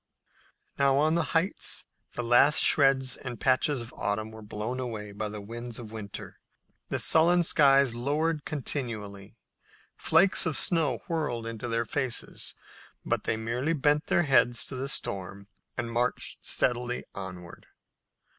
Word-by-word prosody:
Now 140 -1 +4
on 155 +2 +3
the 170 -1 +1
heights 185 +5 -1 0.3
the 120 - -3
last 120 +5 +5
shreds 135 -2 +3
and 120 -3 -7
patches 130 0 +2
of 115 - -12
autumn 110 +2 -2
were 110 0 -11
blown 105 +4 -4
away 110 -5 -5
by 105 +1 -3
the 105 0 -6
winds 115 +2 -6
of 115 -3 -8
winter. 105 -3 -8 0.5
The - - -1
sullen 175 +2 +5
skies 140 -5 +4
lowered 150 +5 -1
continually. 110 -8 -5 0.6
Flakes 185 -3 +3
of 155 - +2
snow 160 -7 +1
whirled 150 -9 -2
into 115 +1 -5
their 115 0 -1
faces, 125 +2 -3 0.5
but - - -1
they 110 - 0
merely 120 +8 -1
bent 150 0 +1
their 175 - +3
heads 120 -6 +3
to - - -7
the 135 +2 -3
storm 100 -4 -3 0.3
and 120 -1 -3
marched 120 +2 -2
steadily 125 0 -1
onward. 90 -3 -9
125 Hz, 145 wpm, -28 LUFS, 110-145 Hz, 0.6 s, last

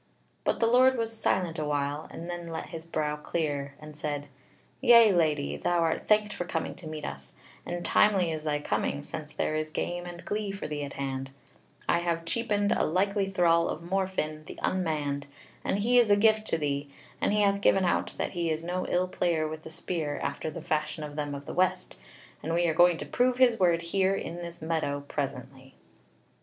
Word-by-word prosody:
But - - 0
the 230 - +3
Lord 255 +2 +5
was 225 -1 -2
silent 180 -6 0
a - - -1
while, 145 0 -1
and 170 - -8
then 175 -1 -5
let 165 -1 -5
his 165 -1 -8
brow 150 -2 -1
clear 145 -3 -2
and 150 0 -11
said: 145 -2 -4 0.5
"Yea, 235 -4 +8
Lady, 150 - +1
thou 175 - +1
art 165 -1 0
thanked 210 0 +3
for - - -3
coming 175 - -3
to 170 - -9
meet 155 -1 -5
us; - - -7 0.3
and 175 0 -4
timely 190 -5 +4
is 155 -1 -3
thy 150 -1 0
coming, 70 - -1
since 155 -1 -7
there - - -1
is 155 0 -1
game 175 +3 -3
and 175 0 -9
glee 210 -1 -2
for 195 - -6
thee 150 -1 -3
at 140 - -6
hand; 135 -1 -3 0.6
I 170 - +3
have 170 -1 -1
cheapened 205 0 0
a - - +2
likely 195 +3 +1
thrall 170 -3 +3
of 160 - -4
Morfinn 175 -4 -2
the - - -9
Unmanned, 150 -6 -1 0.4
and - - 0
he 240 +4 +4
is 235 -3 +4
a 205 - +7
gift 215 +1 +3
to - - +1
thee; 145 -2 -2 0.3
and - - +2
he 210 0 +3
hath 200 -1 +2
given 195 -2 +4
out 175 - 0
that - - -2
he 170 -1 -1
is 160 +1 -1
no 180 +2 -2
ill 180 +1 +1
player 170 -3 0
with 155 0 -6
the 160 - -10
spear 160 -2 -3
after 140 +3 -2
the 155 - -7
fashion 155 0 -1
of 150 -1 -7
them 145 -1 -3
of 140 0 -8
the - - -6
west; 185 +1 0 0.4
and 165 +2 -2
we 175 0 +3
are 160 - +2
going 175 +1 +5
to - - -5
prove 250 0 +1
his 245 -3 +4
word 170 -2 +3
here 190 +3 +2
in 170 -3 -5
this 170 -1 -7
meadow 160 -3 -1
presently." 135 -2 -5
170 Hz, 210 wpm, -28 LUFS, 150-190 Hz, 0.6 s, Yea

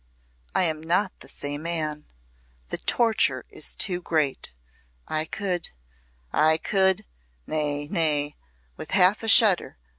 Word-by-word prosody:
I - - +4
am 160 -3 0
not 180 +4 +1
the - - -11
same 145 +1 -3
man! 155 -3 -2 0.6
The - - -3
torture 230 -2 +1
is - - +3
too 180 -3 -2
great. 155 - -1 0.6
I 155 0 -1
could 180 -1 -3 0.6
I 155 +1 +4
could 190 +3 +1 0.4
nay! 145 -1 -1
nay!" 150 -4 0 0.4
with - - -8
half 190 +3 +4
a 225 - -5
shudder. 215 - +4
165 Hz, 125 wpm, -25 LUFS, 150-190 Hz, 0.6 s, I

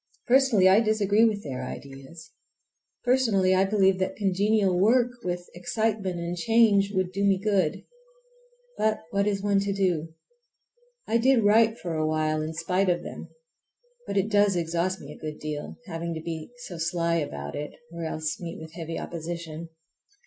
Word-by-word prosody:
Personally, 245 -7 +5
I 190 +3 +6
disagree 215 -1 +3
with 210 -3 0
their 130 -3 -5
ideas. 140 +5 -9 0.7
Personally, 225 -7 +3
I 190 +1 +4
believe 195 -2 +3
that 185 - -1
congenial 200 -1 +2
work, 240 +5 +4
with 175 0 -3
excitement 200 0 -1
and 170 +1 -3
change, 210 0 +3
would 185 -2 -1
do 200 +2 -2
me 200 -1 +4
good. 190 -5 0 0.9
But 215 0 +1
what 200 0 +1
is 200 -1 -1
one 200 -1 +3
to 200 0 -1
do? 175 -5 -1 0.9
I 230 - +2
did 250 -1 +4
write 220 +2 +4
for 175 -6 -5
a 155 -1 0
while 155 0 0
in 155 +1 -4
spite 180 +4 0
of 175 -1 0
them; - - -8 0.8
but - - -2
it 200 +3 +1
does 205 -2 +4
exhaust 175 +2 -1
me 140 - -10
a - - -16
good 155 -1 -5
deal—having 165 +3 -5
to 160 - -5
be 160 -1 -6 0.2
so 175 -3 -8
sly 170 0 0
about 70 - -4
it, 150 0 -5 0.2
or 170 0 -5
else 155 0 -3
meet 170 -2 -6
with 160 0 -10
heavy 165 -1 -5
opposition. 165 -1 -6
185 Hz, 165 wpm, -26 LUFS, 165-205 Hz, 0.9 s, I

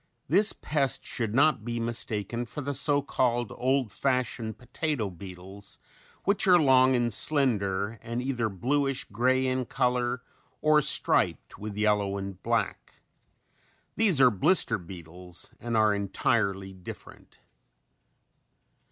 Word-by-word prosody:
This 200 +9 +4
pest 140 -5 0
should 115 -4 -3
not 140 -4 +3
be 120 0 -4
mistaken 115 0 -1
for 145 - -6
the 140 +1 -3
so 145 +1 +1
called 120 -3 -1
old 130 -3 0
fashioned 125 -1 -2
potato 125 -4 -3
beetles 95 +3 -9 0.5
which 200 0 +3
are 180 -1 +6
long 130 -3 +4
and 120 -2 +1
slender 110 -7 +1
and 115 +1 -4
either 125 -3 -2
bluish 135 +7 -1
grey 130 +5 +1
in 130 0 -1
color 125 +1 -1 0.4
or 155 0 +4
striped - - +2
with 105 -1 -7
yellow 105 -2 +1
and 95 -1 -7
black. 115 -3 -2 1.0
These 200 -10 +2
are 130 -2 +6
blister 150 - +3
beetles 90 0 -10
and 115 -1 -2
are 110 -1 +4
entirely 100 -1 -1
different. 90 -1 -12
120 Hz, 125 wpm, -27 LUFS, 100-135 Hz, 1.0 s, are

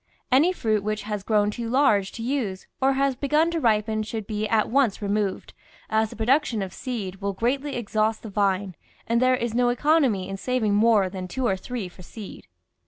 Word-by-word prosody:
Any 290 +8 +5
fruit 220 - 0
which 215 0 -2
has 210 -1 -3
grown 210 0 +2
too 230 +1 -5
large 230 -7 +3
to 225 - -6
use 230 -7 -2 0.2
or 270 +1 +4
has 275 0 +1
begun 300 +5 +2
to 335 - -1
ripen 220 -3 +1
should 215 0 -5
be 215 0 -2
at 220 -1 +2
once 255 -5 +2
removed, 205 -1 -2 0.4
as 220 0 +2
the - - -10
production 235 -1 +1
of 190 -1 -7
seed 215 -8 -5
will 200 0 -3
greatly 270 +8 -1
exhaust 220 -1 -1
the 220 - -6
vine, 195 -1 0 0.3
and 235 +1 +1
there 255 0 +4
is 235 -2 -3
no 245 +1 +3
economy 245 - +2
in 195 0 -5
saving 235 -2 0
more 210 -2 +4
than 185 0 -6
two 260 +8 -3
or 195 - +2
three 220 +1 -5
for 180 +1 -14
seed. 205 +3 -10
220 Hz, 200 wpm, -25 LUFS, 205-255 Hz, 0.4 s, Any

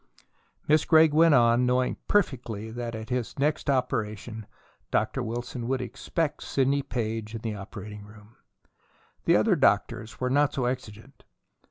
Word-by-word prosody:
Miss 155 0 +4
Gregg 160 -2 +5
went 160 -1 +6
on, 120 0 +4
knowing 125 0 +1
perfectly 120 - 0
that 120 0 -5
at 110 +1 -7
his 125 +1 -2
next 150 +1 0
operation 110 -4 -2 0.4
Dr. 110 +5 0
Wilson 120 +1 -4
would 130 0 0
expect 145 +5 -3
Sidney 140 +1 +1
Page 110 -3 -4
in 115 - -6
the 110 -1 -3
operating 105 +1 -8
room. 105 +1 -16 0.9
The - - +5
other - - +4
doctors 115 +2 +1
were 125 0 -1
not 145 +1 +3
so 130 - -1
exigent. 115 -4 -6
120 Hz, 145 wpm, -27 LUFS, 110-135 Hz, 0.9 s, went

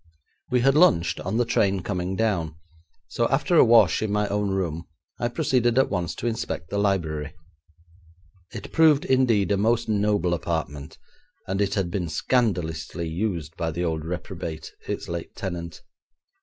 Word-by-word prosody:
We 125 -1 +2
had 135 +2 +4
lunched 140 - +4
on 95 +5 -2
the 120 - +2
train 100 -4 +1
coming 90 -1 -2
down, 95 -8 0 0.5
so 115 +7 0
after 145 +6 +1
a - - +8
wash 115 -7 +5
in 110 -2 -1
my 105 0 +1
own 105 0 0
room 85 -4 -2 0.3
I 120 - 0
proceeded 125 -3 +1
at 135 - +3
once 90 -3 -2
to - - -6
inspect 110 -8 -3
the 100 - 0
library. 80 -7 -1 1.2
It - - -8
proved, 155 -3 +5
indeed, 120 -7 +2
a 100 - +3
most 115 +3 +1
noble 105 -4 +1
apartment, 80 -3 -4 0.5
and 95 +2 -2
it 100 -1 0
had 95 -3 -1
been 90 -3 -2
scandalously 85 -7 -1
used 85 -3 -3
by 85 - -1
the 85 +2 -3
old 80 -2 -2
reprobate, 80 -2 -6 0.2
its - - -4
late 85 -1 -6
tenant. 85 -4 -6
95 Hz, 160 wpm, -25 LUFS, 85-115 Hz, 1.2 s, a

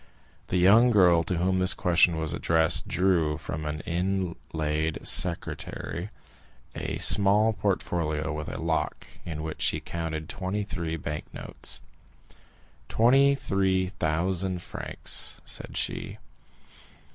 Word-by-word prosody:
The 90 - -1
young 105 +7 +6
girl 90 -7 +5
to 90 - -1
whom 95 +2 +1
this 95 0 +4
question 85 -1 +3
was 80 -1 -2
addressed 80 +1 +3
drew 85 -5 +1
from 75 +1 -6
an 75 0 -4
inlaid 85 -4 -2
secretaire 85 +1 -1 0.6
a - - -4
small 105 +2 +5
portfolio 80 -6 -2
with 75 +1 -5
a - - -6
lock, 80 0 -2 0.2
in 80 -2 -5
which 80 -1 -6
she - - +1
counted 80 -2 -5
twenty 95 +2 -3
three 85 -5 -4
bank 75 -1 -6
notes. - - -4 1.1
"Twenty 135 +5 +4
three 95 -6 0
thousand 90 +1 -2
francs," - - -1
said - - -2
she. - - -3
90 Hz, 120 wpm, -26 LUFS, 80-95 Hz, 1.1 s, young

